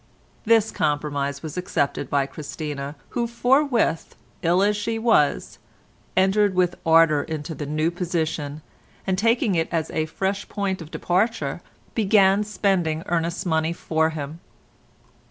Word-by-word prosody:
This 225 Hz, -1 st, +4 dB
compromise 145 Hz, -2 st, -1 dB
was 155 Hz, +1 st, -6 dB
accepted 145 Hz, -6 st, -1 dB
by 140 Hz, -1 st, +2 dB
Christina 145 Hz, 0 st, -6 dB
who 235 Hz, -1 st, -1 dB
forthwith, 245 Hz, -, +1 dB, 0.3 s
ill 175 Hz, +3 st, +3 dB
as 210 Hz, +1 st, +2 dB
she 225 Hz, +2 st, -2 dB
was, 225 Hz, -11 st, +2 dB, 0.6 s
entered 195 Hz, +1 st, +3 dB
with 180 Hz, -1 st, +2 dB
ardour 160 Hz, -2 st, +5 dB
into 155 Hz, +1 st, -5 dB
the 145 Hz, -1 st, -6 dB
new 155 Hz, +3 st, 0 dB
position, 160 Hz, -4 st, -3 dB, 0.4 s
and 190 Hz, -, +1 dB
taking 225 Hz, +1 st, +2 dB
it 165 Hz, -2 st, 0 dB
as 160 Hz, -2 st, -1 dB
a 155 Hz, 0 st, -1 dB
fresh 195 Hz, +5 st, -3 dB
point 195 Hz, -3 st, -2 dB
of 160 Hz, -, -9 dB
departure, 180 Hz, -4 st, -1 dB, 0.3 s
began 200 Hz, -2 st, +4 dB
spending 185 Hz, -6 st, 0 dB
Ernest's 170 Hz, +1 st, -1 dB
money 160 Hz, -1 st, +1 dB
for 160 Hz, -1 st, 0 dB
him. 155 Hz, 0 st, -6 dB
170 Hz, 135 wpm, -23 LUFS, 155-200 Hz, 0.6 s, ardour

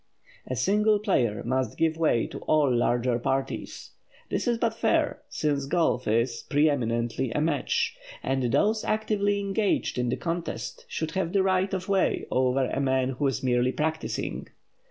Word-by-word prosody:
A 130 Hz, -, -2 dB
single 210 Hz, -, +3 dB
player 125 Hz, -, 0 dB
must 130 Hz, -1 st, -1 dB
give 160 Hz, -1 st, +2 dB
way 155 Hz, -8 st, +2 dB
to -, -, -7 dB
all 145 Hz, -5 st, +3 dB
larger 120 Hz, 0 st, +1 dB
parties. 135 Hz, +3 st, -3 dB, 0.4 s
This -, -, -1 dB
is 240 Hz, -1 st, +2 dB
but 230 Hz, -1 st, 0 dB
fair, -, -, +1 dB
since 145 Hz, -3 st, -1 dB
golf 160 Hz, -6 st, +1 dB
is, 115 Hz, +2 st, +1 dB
preeminently, 125 Hz, -5 st, +1 dB
a -, -, 0 dB
match; 150 Hz, -3 st, 0 dB, 0.3 s
and 135 Hz, -1 st, 0 dB
those 215 Hz, -, +2 dB
actively 210 Hz, -2 st, 0 dB
engaged 200 Hz, -, 0 dB
in 125 Hz, -1 st, 0 dB
the -, -, -1 dB
contest 170 Hz, 0 st, -4 dB
should 160 Hz, 0 st, -3 dB
have 185 Hz, -1 st, -2 dB
the 195 Hz, -1 st, +3 dB
right 190 Hz, 0 st, +1 dB
of 185 Hz, -1 st, -3 dB
way 195 Hz, -1 st, +1 dB
over 130 Hz, +1 st, +2 dB
a -, -, -1 dB
man 130 Hz, -1 st, +1 dB
who 135 Hz, +2 st, -1 dB
is 135 Hz, -1 st, -2 dB
merely 125 Hz, 0 st, +2 dB
practising. 160 Hz, +1 st, -3 dB
145 Hz, 160 wpm, -27 LUFS, 125-190 Hz, 0.4 s, single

